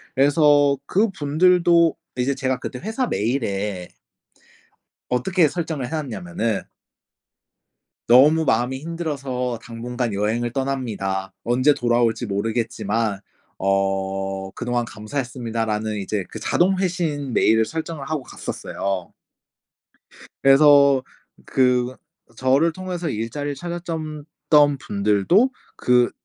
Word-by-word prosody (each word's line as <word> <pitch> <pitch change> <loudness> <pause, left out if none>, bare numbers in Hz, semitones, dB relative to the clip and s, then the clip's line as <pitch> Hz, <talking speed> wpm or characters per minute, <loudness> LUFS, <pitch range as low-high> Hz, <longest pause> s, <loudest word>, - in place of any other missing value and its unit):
그래서 145 0 +4
그분들도 175 -3 +3 0.2
이제 130 +2 0
제가 130 -1 -1
그때 125 - -6
회사 225 - -2
메일에 105 - -2 1.2
어떻게 165 +7 +2
설정을 160 -6 -3
해 - - -11
놨냐면은 110 - -2 1.5
"너무 145 +7 +6
마음이 125 +3 +1
힘들어서 140 -7 -3
당분간 120 0 -4
여행을 110 +4 -1
떠납니다. 110 -8 -3
언제 130 +5 +3
돌아올지 120 -2 +1
모르겠지만 110 0 -1 0.4
어 95 0 -1
그동안 120 +1 -2
감사했습니다."라는 115 -2 -3
이제 100 0 -2
그 - - -8
자동 185 +2 +2
회신 165 -8 -2
메일을 110 0 +4
설정을 160 0 -5
하고 155 -4 -2
갔었어요. 95 -7 -5 1.3
그래서 140 -1 +6 0.4
그 125 -1 +1 0.4
저를 135 +7 +3
통해서 180 -1 -4
일자리를 140 +6 -3
찾았전 165 -3 -5 0.2
던 145 -2 +5
분들도 105 - +2 0.2
그 125 -1 +3
130 Hz, 255 characters per minute, -22 LUFS, 110-150 Hz, 1.5 s, 너무